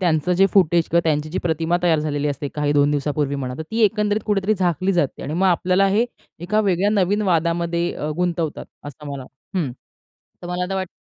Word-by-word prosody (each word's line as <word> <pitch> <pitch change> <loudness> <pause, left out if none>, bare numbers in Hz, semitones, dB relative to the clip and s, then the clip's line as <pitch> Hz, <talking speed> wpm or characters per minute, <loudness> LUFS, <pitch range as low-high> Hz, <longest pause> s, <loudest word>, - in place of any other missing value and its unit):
त्यांचं 170 -1 +1
जे 195 +2 +4
फुटेज 170 -3 +3
किंवा 170 - +3
त्यांची 155 -1 0
जी 180 - -3
प्रतिमा 165 0 0
तयार 165 -3 +3
झालेली 150 -1 -1
असते 145 0 -3
काही 150 -1 0
2 145 0 +3
दिवसापूर्वी 145 0 -1
म्हणा, 130 -2 -4
तर - - -3
ती 225 - -1
एकंदरीत 210 0 +1
कुठेतरी 205 0 +1
झाकली 185 0 0
जाते 170 -7 -1
आणि 150 - -4
मग 190 +2 +2
आपल्याला 185 +2 +3
हे 210 +4 +3 0.3
एका 190 +6 0
वेगळ्या 200 -1 +1
नवीन 205 0 +1
वादामध्ये 170 -1 0
अ, 150 - -4
गुंतवतात 170 -3 -2 0.2
असं 145 +1 -10
मला 135 -2 -6 0.3
हं. 165 -8 0 0.7
तर 175 - -7
मला 180 +1 -2
तर 195 - -2
वाटत 190 -1 -2
170 Hz, 200 wpm, -21 LUFS, 150-190 Hz, 0.7 s, जे